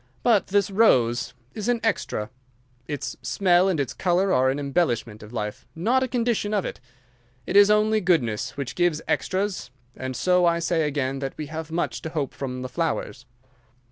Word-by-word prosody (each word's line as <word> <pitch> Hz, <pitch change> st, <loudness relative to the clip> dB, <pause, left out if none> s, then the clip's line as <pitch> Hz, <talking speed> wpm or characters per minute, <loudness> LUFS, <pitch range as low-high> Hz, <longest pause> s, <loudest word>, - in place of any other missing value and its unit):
But 225 Hz, -5 st, +3 dB
this 200 Hz, 0 st, +1 dB
rose 125 Hz, -, +3 dB, 0.2 s
is 215 Hz, 0 st, -4 dB
an 240 Hz, -1 st, +2 dB
extra. 115 Hz, -, -1 dB, 0.6 s
Its 145 Hz, -3 st, -4 dB
smell 185 Hz, -1 st, +3 dB
and 175 Hz, -5 st, 0 dB
its 140 Hz, -, -1 dB
colour 185 Hz, +1 st, +1 dB
are 130 Hz, +1 st, +3 dB
an 135 Hz, -, 0 dB
embellishment 130 Hz, -7 st, -1 dB
of 105 Hz, -, -11 dB
life, 105 Hz, -3 st, -5 dB
not 235 Hz, +11 st, +2 dB
a 260 Hz, -, +1 dB
condition 230 Hz, -4 st, 0 dB
of 200 Hz, -, 0 dB
it. -, -, -5 dB, 0.7 s
It -, -, -4 dB
is 205 Hz, 0 st, +8 dB
only 215 Hz, +1 st, +3 dB
goodness 135 Hz, -, 0 dB
which 140 Hz, -2 st, -4 dB
gives 175 Hz, -3 st, +1 dB
extras, 190 Hz, -6 st, -1 dB, 0.3 s
and 130 Hz, 0 st, -5 dB
so 180 Hz, +7 st, +3 dB
I 170 Hz, 0 st, +3 dB
say 165 Hz, -2 st, +1 dB
again 135 Hz, -2 st, -2 dB
that 135 Hz, -1 st, -5 dB
we 155 Hz, -, -4 dB
have 160 Hz, 0 st, -5 dB
much 170 Hz, +1 st, -2 dB
to 160 Hz, -, -5 dB
hope 150 Hz, -4 st, -3 dB
from 130 Hz, -2 st, -5 dB
the -, -, -3 dB
flowers." 145 Hz, -6 st, -3 dB
165 Hz, 180 wpm, -24 LUFS, 130-200 Hz, 0.7 s, is